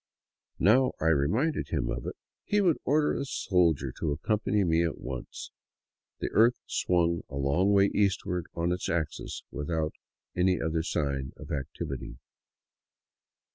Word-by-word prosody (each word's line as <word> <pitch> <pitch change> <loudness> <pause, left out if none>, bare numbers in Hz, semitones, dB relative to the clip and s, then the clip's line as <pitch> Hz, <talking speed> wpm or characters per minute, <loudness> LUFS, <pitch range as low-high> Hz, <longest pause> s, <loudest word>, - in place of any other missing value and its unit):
Now 125 +8 +4
I 80 - +2
reminded 105 - +1
him - - -1
of - - -4
it, - - -4 0.3
he 205 - +1
would 180 -6 +3
order 150 +2 +3
a - - -2
soldier 85 - +1
to 80 - 0
accompany 105 +6 0
me 85 -2 +3
at 85 - -1
once. 65 -1 -7 0.7
The - - -3
earth 115 +3 +5
swung 85 -2 +1
a - - -8
long 70 +9 +2
way 100 0 +4
eastward 90 -4 0
on 85 +1 0
its 90 0 -2
axis 80 -3 -3
without 80 +1 -2 0.4
any 90 0 +2
other 80 0 0
sign 70 -5 -2
of - - -10
activity. 70 -3 -5
85 Hz, 140 wpm, -29 LUFS, 75-100 Hz, 0.7 s, earth